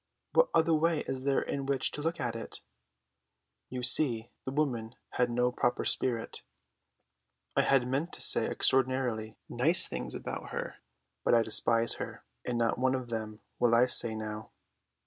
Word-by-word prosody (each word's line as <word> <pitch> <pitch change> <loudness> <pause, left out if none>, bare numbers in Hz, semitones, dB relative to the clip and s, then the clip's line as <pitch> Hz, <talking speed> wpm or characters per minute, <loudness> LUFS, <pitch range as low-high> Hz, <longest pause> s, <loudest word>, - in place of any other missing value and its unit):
"What - - +4
other 165 0 +3
way 160 0 +2
is 130 0 -5
there 140 -1 +2
in 140 -1 -4
which 135 -2 0
to 150 - -6
look 165 +2 -2
at 120 -2 -2
it?" 115 - -8 1.1
You 125 -1 -5
see, 120 -4 +4
the 130 - -3
woman 125 -6 -2 0.2
had 125 -1 +1
no 125 +1 +1
proper 120 0 -1
spirit. 115 -3 -2 1.1
I - - +4
had 135 -3 +2
meant 140 +8 -2
to - - -4
say - - +3
extraordinarily 130 -4 0
nice 150 +9 +3
things - - -5
about - - -6
her; - - -5 0.5
but - - +4
I 115 - +4
despise 115 +1 +2
her, - - -7 0.2
and 120 -1 -2
not 115 0 0
one 130 +1 +2
of 125 -2 -5
them 110 -1 -5 0.2
will 120 -1 +4
I 120 +2 +5
say 120 -2 0
now. 110 0 -6
125 Hz, 165 wpm, -30 LUFS, 115-135 Hz, 1.1 s, I